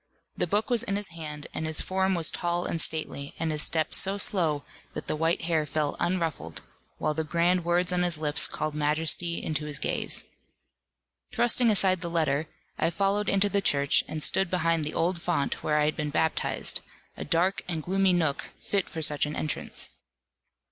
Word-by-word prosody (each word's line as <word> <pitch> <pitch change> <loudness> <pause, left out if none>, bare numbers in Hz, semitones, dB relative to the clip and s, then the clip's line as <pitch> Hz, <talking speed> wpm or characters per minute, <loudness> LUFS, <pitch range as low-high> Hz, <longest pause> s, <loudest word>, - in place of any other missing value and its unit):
The - - -1
book 215 +5 0
was 235 -2 +4
in 200 -4 -1
his 205 0 -1
hand, 150 -3 -8
and 160 - -3
his 155 - +2
form 190 0 +1
was 170 -2 +3
tall 175 0 -1
and 165 - -2
stately, 150 -3 -1
and 165 -1 -1
his 150 -1 +1
step 160 0 +1
so 195 +1 +4
slow, 165 -8 +1 0.3
that - - -6
the - - -2
white 165 +2 0
hair 160 -2 +1
fell 145 0 -1
unruffled, 165 - -2 0.4
while 155 - 0
the 160 +1 -2
grand 170 +3 +1
words 175 +1 +1
on 180 - +1
his 175 -2 +1
lips 150 -1 +2
called 155 - -3
majesty 155 +3 +1
into 155 -1 -2
his 150 -2 -3
gaze. - - -1 1.1
Thrusting 240 0 +3
aside 190 -4 +3
the 170 - -3
letter, 155 -2 0 0.3
I 165 - +2
followed 200 +3 0
into 200 +1 +3
the 200 0 0
Church, 140 -6 +2
and 155 -1 -2
stood 190 -2 +3
behind 165 -3 +1
the 150 - -3
old 170 +1 0
font 170 -6 -1
where 150 - +1
I 150 - +3
had 155 - 0
been 150 -1 -2
baptized; 160 +2 0 0.3
a - - -6
dark 175 +5 +1
and 165 -3 -3
gloomy 190 +2 +2
nook, 160 -5 0
fit 200 -2 -2
for 160 -2 -4
such 150 -1 +2
an 150 - -5
entrance. 155 - -2
165 Hz, 190 wpm, -27 LUFS, 155-185 Hz, 1.1 s, was